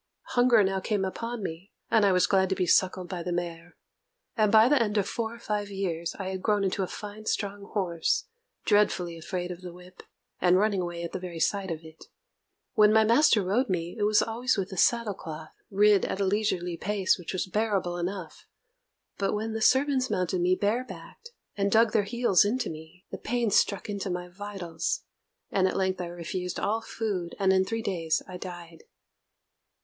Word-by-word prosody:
Hunger 245 -3 +5
now 190 0 0
came 200 0 -1
upon 230 +3 -4
me, 175 +3 -7 0.2
and 220 - +5
I 200 - +5
was 180 -1 +4
glad 190 -1 +2
to 190 - +1
be 185 - 0
suckled 185 +1 +2
by 180 -2 -5
the 180 - -4
mare; 175 0 -4 0.6
and 215 -3 +3
by 220 +1 +7
the 280 -1 +4
end 210 -2 0
of 200 -1 +1
four 230 0 -3
or - - -11
five 210 -3 -3
years 175 -4 -3
I 190 -2 -4
had 190 -1 -4
grown 210 -1 +1
into 195 0 0
a 185 - -1
fine 210 +2 -8
strong 200 -1 -2
horse, 180 - -1 0.4
dreadfully 200 -5 +2
afraid 180 +2 -4
of 175 0 -8
the 180 -1 -7
whip, 180 +1 -14 0.4
and 180 0 +4
running 200 -1 +2
away 175 -1 -4
at 170 - -5
the - - -4
very 175 -2 -7
sight 195 +3 0
of 165 -1 -4
it. 160 0 -13 0.7
When 210 0 +6
my 220 0 +5
master 230 -1 +4
rode 230 +8 +1
me, 175 -2 -2
it 215 - -6
was 210 +1 +4
always 235 +2 0
with 195 -1 -2
a - - -5
saddle 230 +2 +2
cloth, 155 -3 -9 0.2
and 205 0 +4
at - - -3
a 200 - +2
leisurely 185 -4 0
pace, 200 0 +1
which 175 - -6
was 185 - -1
bearable 195 -3 -1
enough; 180 -1 -5 0.7
but 195 +1 0
when 220 +1 -3
the 220 - -3
servants 265 +1 +3
mounted 180 0 0
me 180 +1 +3
barebacked, 245 - -3 0.3
and 200 0 0
dug 225 +1 +5
their 210 -3 +2
heels 235 -3 +3
into 230 +1 -1
me, 160 +3 -12
the - - -6
pain 240 -2 -1
struck 200 0 +2
into 200 -2 -3
my 180 0 -4
vitals; 195 - -4 0.5
and 190 -1 +3
at - - -2
length 190 -1 0
I 175 - -4
refused 175 +1 -4
all 220 +2 0
food, 205 -6 -3
and 190 -1 +3
in 190 0 +3
three 225 +2 -3
days 165 -6 -1
I 185 - -7
died. 175 -3 -9
195 Hz, 200 wpm, -28 LUFS, 180-215 Hz, 0.7 s, by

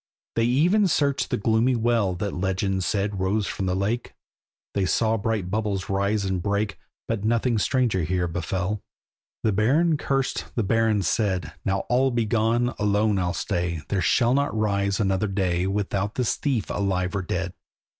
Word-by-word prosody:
They 115 - +2
even 175 - +3
searched 140 -5 +1
the - - 0
gloomy 115 +4 +2
well 115 -5 +1
That 100 +2 -3
legend 95 +1 -1
said 100 +2 -1
rose 100 +3 +1
from 95 0 -3
the 90 - 0
lake; 105 +5 -2 0.6
They 100 - 0
saw 110 +3 +2
bright 105 -4 -2
bubbles 100 -3 -1
rise 100 +1 0
and 95 -2 -1
break, 100 +2 -1 0.3
But 115 -3 -2
nothing 115 +1 +1
stranger 120 -5 +1
here 90 +2 0
befell. 90 +4 -2 0.6
The 110 - +3
Baron 145 - +3
cursed—the 135 -4 -1
Baron 110 0 +2
said, 90 -5 0
"Now 95 0 0
all 130 +3 +2
be 120 -3 0
gone, 115 +2 +1
alone 105 0 +2
I'll 90 -1 -1
stay, 85 -2 -2
There 100 -2 0
shall 120 +6 +3
not 140 -4 0
rise 100 -1 +1
another 95 0 +1
day 95 -2 0
Without 100 +1 -1
this 125 -3 +1
thief, 130 - -1
alive 95 -1 -1
or 100 - 0
dead." 90 0 -3
105 Hz, 165 wpm, -25 LUFS, 95-115 Hz, 0.6 s, even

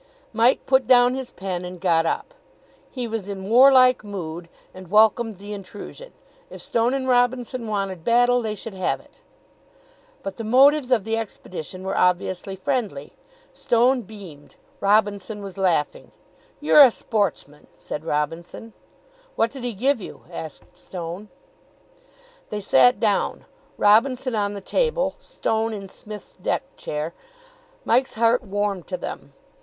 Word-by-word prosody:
Mike 230 +3 +3
put 265 -3 +3
down 245 -1 +6
his 265 -1 -5
pen, 185 -2 -5
and 180 0 -8
got 165 -2 +2
up. - - -3 0.6
He 250 -3 -4
was 220 -3 -4
in 195 -1 -6
warlike 255 -1 +6
mood, 175 -4 -6 0.2
and 185 -2 -12
welcomed 220 +1 +3
the 205 +2 -8
intrusion. 205 - -10 0.4
If - - -10
Stone 235 +3 0
and 265 -1 -2
Robinson 245 -1 +1
wanted 195 -5 -3
battle, 245 +2 +3
they 215 -2 -3
should 215 +1 -8
have 185 -1 -1
it. - - -23 1.0
But 195 - -6
the 230 - -5
motives 265 +4 +4
of 230 -5 +3
the 225 +2 -1
expedition 185 -4 -7
were 190 +1 -3
obviously 180 +1 0
friendly. 190 - -3 0.4
Stone 245 +2 +2
beamed. 190 -9 -13 0.2
Robinson 205 0 +1
was 195 -2 -8
laughing. 180 -6 -1 0.5
"You're 300 0 +6
a 265 - +8
sportsman," 195 -10 -3
said 150 - -6
Robinson. 165 +8 -4 0.6
"What 230 - +1
did 270 -3 -9
he 245 -3 -3
give 255 +3 +1
you?" - - -10
asked 160 -3 -9
Stone. 180 +3 -7 1.2
They 210 -1 -4
sat 130 -3 +4
down, 210 -3 0 0.3
Robinson 250 +5 +3
on 205 -1 -1
the 200 - -6
table, - - 0
Stone 225 - -2
in 200 -2 -6
Psmith' 210 +2 -9
s - - -19
deck 270 - -1
chair. 150 +3 -4 0.7
Mike's 255 +3 +2
heart 230 +2 +3
warmed 200 -2 -3
to 185 - -3
them. - - -7
210 Hz, 145 wpm, -23 LUFS, 185-245 Hz, 1.2 s, a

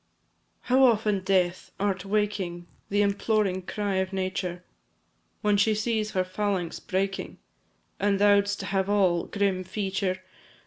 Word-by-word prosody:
How 260 +1 +3
often, 215 -5 +3
Death! 185 -2 0
art 195 -1 -1
waking 195 -4 -1 0.2
The 205 +1 +3
imploring 200 -1 +1
cry 205 -3 -1
of 190 0 -1
Nature! 185 -2 -3 0.8
When 210 -1 +3
she 215 +1 +3
sees 215 0 0
her 185 - +2
phalanx 185 -2 -2
breaking, 195 +1 -2 0.6
As 200 0 +2
thou'dst 205 0 +3
have 195 0 -1
all 185 -4 +2
grim 195 -2 0
feature! 190 -1 -2
195 Hz, 125 wpm, -27 LUFS, 185-205 Hz, 0.8 s, How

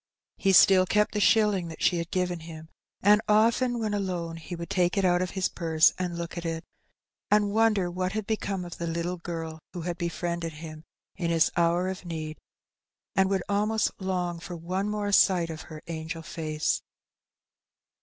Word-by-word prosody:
He 195 - +2
still 185 0 +7
kept 210 +2 +2
the 210 - 0
shilling 210 -4 +3
that 160 - -7
she 175 - +3
had 170 0 -4
given 180 -2 -1
him, 160 -1 -10 0.3
and 210 +2 +6
often 235 +3 +3
when 215 -2 -1
alone 180 -5 -2
he 165 +2 -7
would 170 0 -7
take 180 +1 +1
it 195 - +2
out 175 0 +3
of 185 - -1
his 185 - +2
purse 160 -2 +3
and 175 -2 -2
look 170 0 -5
at - - -8
it, 165 -1 -3 0.7
and 205 -1 +3
wonder 210 -4 +2
what 185 +1 -2
had 215 -1 -2
be 220 +1 +1
come 195 -3 -4
of 175 - -9
the 170 - -2
little 170 +2 -2
girl 165 -2 -6
who 175 - -5
had 175 +1 -4
befriended 170 -1 -3
him 155 0 -9 0.3
in 170 - -1
his 165 -1 +3
hour 170 +1 +2
of 190 0 -5
need, 155 -3 -5 0.8
and 190 -1 +3
would 195 -2 0
almost 210 +1 +1
long 180 -2 -2
for 175 +1 -7
one 185 +5 -2
more 210 -1 -2
sight 180 -4 +4
of 160 0 -7
her 155 0 -9
angel 165 0 -5
face. 155 -1 -2
175 Hz, 190 wpm, -27 LUFS, 165-195 Hz, 0.8 s, still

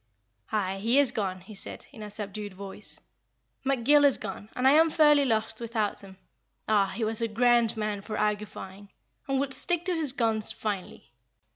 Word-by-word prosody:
"Aye, 195 -2 -1
he 230 +6 +2
is 285 -2 +5
gone," 190 -3 -3
he 195 +4 -12
said, 195 - -6
in 235 -6 -12
a 210 - -6
subdued 205 -1 -6
voice. 200 +2 -6 0.6
"McGill 275 +2 +4
is 280 -2 +5
gone, 205 +1 -7
and 255 +1 +2
I - - +7
am 320 +2 +6
fairly 295 -3 +5
lost 220 -2 -1
without 225 -3 -2
him. 190 -1 -13 0.5
Ah! 205 -2 +3
he 210 +4 -4
was 220 +1 0
a 230 - +1
grand 235 0 +3
man 210 -2 -2
for 215 +1 -5
argufying, 205 -2 -3 0.4
and 270 -1 +1
would 275 -1 +1
stick 350 +3 +2
to 370 - +1
his 315 -5 +1
guns 225 -4 0
finely. 195 - -5
220 Hz, 180 wpm, -28 LUFS, 205-265 Hz, 0.6 s, I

